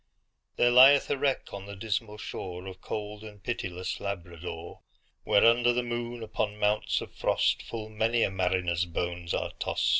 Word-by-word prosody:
There 120 - +4
lieth 135 +3 +7
a 145 - +1
wreck 140 -2 0
on 100 0 -7
the 100 - -7
dismal 105 +1 -3
shoreOf 95 -2 -7
cold 105 0 -5
and 105 -2 -11
pitiless 90 -6 -3
Labrador; 85 -3 -6 0.4
Where, 100 - +5
under 120 +1 +5
the 125 +1 0
moon, 120 0 -4
upon 105 -1 -2
mounts 105 0 +1
of - - -9
frost, - - +1
Full 110 -2 -6
many 110 +2 +1
a - - +1
mariner's 90 -2 +1
bones 85 0 -3
are - - -2
tost. - - 0
105 Hz, 160 wpm, -29 LUFS, 90-115 Hz, 0.4 s, lieth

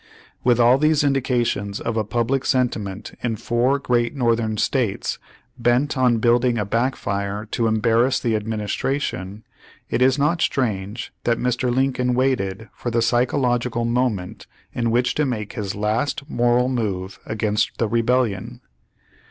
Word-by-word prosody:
With 120 -1 +3
all 120 +3 +5
these 155 0 +3
indications 125 -7 0
of 115 - -3
a 110 - +1
public 120 +5 0
sentiment 110 -7 -1
in 115 -2 -1
four 120 +5 +1
great 120 -1 0
Northern 115 -4 +1
states, 115 -2 -1 0.4
bent 120 +5 +2
on 125 -3 +3
building 120 +1 +2
a 105 - -1
backfire 105 -3 -2
to 115 - +1
embarrass 115 +3 +2
the 115 -3 0
ad 105 0 -3
ministration, 105 -2 -3 0.5
it 125 - 0
is 130 +1 +4
not 150 +4 +1
strange 110 -3 -1
that 120 -1 +2
Mr. 125 0 0
Lincoln 125 -1 +1
waited 115 -5 0
for 120 - -4
the 115 -1 +1
psychological 120 -1 +1
moment 115 -6 -1 0.3
in 115 -1 0
which 125 +2 +2
to 150 - +1
make 105 -5 -4
his 105 -5 -4
last 110 +7 -1
moral 120 -1 +2
move 100 -7 -3
against 105 -1 -1
the 115 - +1
Rebellion. 115 -1 0
120 Hz, 145 wpm, -22 LUFS, 110-125 Hz, 0.5 s, all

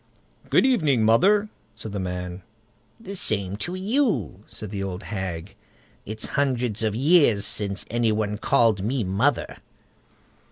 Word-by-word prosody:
"Good - - +4
evening, 155 - +3
mother!" 200 - +4 0.3
said 110 - -7
the 100 - -3
man. 90 0 -4 0.6
"The 200 -3 -8
same 100 - 0
to 175 +11 -3
you", 200 - 0
said 105 -2 -7
the 100 -2 -4
old 95 0 -5
hag. 95 -2 -5 0.5
"It's 110 +1 -4
hundreds 125 -6 0
of 110 -2 0
years 135 - +4
since 100 -2 -1
any 120 -1 +2
one 105 -1 -1
called 110 -5 +3
me 120 +4 -1
mother." 100 +10 0
110 Hz, 135 wpm, -24 LUFS, 100-145 Hz, 0.6 s, Good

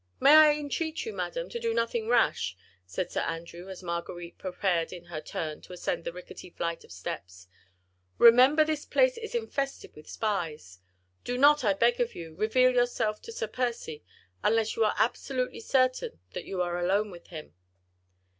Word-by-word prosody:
"May 280 - +7
I 310 -1 +9
entreat 310 +4 -3
you, 445 - -5
madam, - - -3
to 475 - -5
do 460 -1 -1
nothing 230 -1 -1
rash," 225 - +2 0.3
said 175 - -3
Sir - - -1
Andrew, 170 +2 -5
as 190 -1 -9
Marguerite 170 0 -5
prepared 180 -3 -1
in 175 -1 -8
her 155 - -3
turn 155 -1 -5
to - - -12
ascend 175 -1 -3
the - - -2
rickety 180 +1 -10
flight 170 -1 -4
of - - -17
steps. 90 0 -7 0.7
"Remember 255 +6 +7
this 305 -1 -2
place - - +3
is 450 +1 -6
infested 280 -12 -3
with 150 - -14
spies. 160 - -3 0.4
Do 245 - -2
not, 290 +1 +6
I 205 -3 +3
beg 235 +4 +2
of 240 -1 -1
you, 165 -2 -8
reveal 240 +7 +3
yourself 245 -3 +1
to 460 - -9
Sir 460 - -3
Percy, 235 -11 -3 0.4
unless 220 0 +2
you 225 - +2
are 210 - +1
absolutely 250 +2 -1
certain 255 - +1
that - - -6
you 185 -2 -2
are 175 0 -2
alone 200 +4 +1
with 175 -1 -12
him." 155 -3 -9
215 Hz, 175 wpm, -28 LUFS, 170-260 Hz, 0.7 s, I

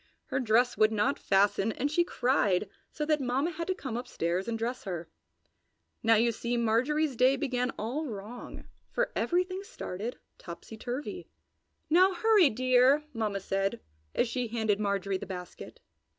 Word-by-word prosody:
Her 265 - 0
dress 245 0 +2
would 215 0 +5
not 215 +5 +1
fasten 200 +2 +2
and 285 +3 -1
she 345 +3 +3
cried, 215 - +1 0.2
so 300 - -3
that 305 -1 +1
Mamma 265 +6 0
had 335 0 -5
to 375 - 0
come 265 -9 -5
upstairs 190 -7 -2
and 230 -1 -1
dress 240 +3 -3
her. 175 -4 -4 1.0
So 225 0 +5
you 235 +2 +3
see 235 +2 -2
Marjorie's 255 +6 +1
day 255 +3 +4
began 250 -1 -1
all 265 +9 -3
wrong, 220 +1 -8 0.3
for - - -1
everything 365 +2 0
started 230 - -6 0.2
topsy 170 +5 -9
turvy. 245 +6 -5 0.6
"Now 370 +4 +5
hurry, 415 -4 +5
dear!" 255 +4 +4
Mamma 210 -4 -2
said 195 +1 -1 0.4
as 240 - +2
she 245 +1 -2
handed 220 -2 0
Marjorie 200 -2 -1
the - - -7
basket. 180 -2 -8
240 Hz, 155 wpm, -29 LUFS, 210-280 Hz, 1.0 s, would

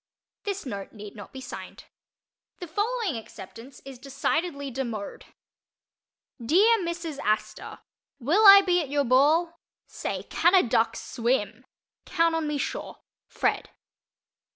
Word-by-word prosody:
This 400 -3 -4
note 200 -6 -6
need 210 -1 -10
not 205 -2 -11
be 265 - -9
signed. - - -9 0.7
The 360 - -7
following 410 - -2
"acceptance" 225 +4 -12
is 270 -2 -10
decidedly 280 +2 -2
demode: 235 -5 -5 1.2
DEAR 410 - +4
MRS. 340 -4 -5
ASTOR: 215 +1 -2 0.4
Will 310 - +2
I 395 0 +11
be 360 -2 +2
at 290 - -6
your 285 0 +1
ball? 310 +7 +3 0.3
Say, - - -5
can 345 +3 +2
a 370 - +6
duck 225 -2 +1
swim? 235 -1 -2 0.4
Count 335 -2 +2
on 325 -1 -1
me 300 -1 -2
sure. - - -5 0.3
FRED. - - -1
280 Hz, 130 wpm, -26 LUFS, 235-345 Hz, 1.2 s, I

